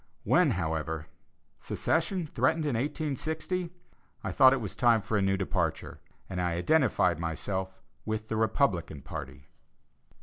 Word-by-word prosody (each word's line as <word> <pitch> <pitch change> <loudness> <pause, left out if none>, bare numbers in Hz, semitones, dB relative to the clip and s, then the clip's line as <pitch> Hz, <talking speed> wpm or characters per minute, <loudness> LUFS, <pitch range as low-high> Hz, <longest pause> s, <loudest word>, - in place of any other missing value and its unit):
When, - - +4
however, 80 0 -2 0.5
secession 165 +2 0
threatened 155 +3 +1
in 145 - 0
1860, 155 +7 -2 0.5
I - - -2
thought 130 -2 +7
it 135 - +2
was 105 -5 -5
time 120 -2 +4
for 110 - -3
a 105 - +3
"new 95 0 +2
departure," 95 - -2 0.3
and 90 -1 -3
I 90 -1 0
identified 90 - +2
myself 95 +3 -3 0.2
with 110 0 -3
the 110 - -2
Republican 95 - 0
party. 70 - -7
110 Hz, 135 wpm, -29 LUFS, 90-145 Hz, 0.5 s, thought